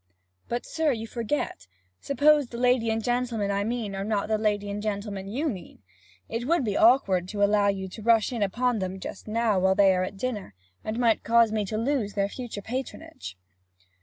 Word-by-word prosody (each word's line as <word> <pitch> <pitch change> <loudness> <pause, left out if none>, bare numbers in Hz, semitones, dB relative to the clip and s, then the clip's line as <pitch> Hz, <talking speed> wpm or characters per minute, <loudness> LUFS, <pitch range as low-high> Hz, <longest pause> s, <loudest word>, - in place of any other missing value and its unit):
'But, 240 +1 -2
sir, 320 -2 0
you 225 -3 -3
forget. 230 - -3 0.3
Suppose 290 0 +3
the 235 - -8
lady 245 -1 +2
and 225 0 -1
gentleman 240 -4 0
I 200 0 0
mean 225 -2 -3
are 195 - -3
not 210 0 -1
the 215 -1 +1
lady 205 -1 0
and 205 +1 -4
gentleman 200 -2 -4
you 265 +10 -2
mean? 185 - -7 0.4
It 235 +2 -4
would 335 -4 +2
be 205 -2 -1
awkward 200 -7 +4
to 205 +1 -1
allow 205 0 +3
you 195 -1 -1
to 215 - -10
rush 230 +2 +3
in 235 - -3
upon 240 +4 +1
them 190 0 -4
just 190 - -8
now 220 -2 +1
while 190 +1 +3
they 195 -1 +5
are 180 - +1
at 195 +1 -5
dinner, 210 - -4 0.3
and 215 +1 -3
might 235 -3 +2
cause 230 -1 +4
me 215 -1 0
to 215 +2 -3
lose 230 -3 -1
their 200 -1 +1
future 230 -4 -7
patronage.' 220 - -6
215 Hz, 200 wpm, -26 LUFS, 200-240 Hz, 0.4 s, they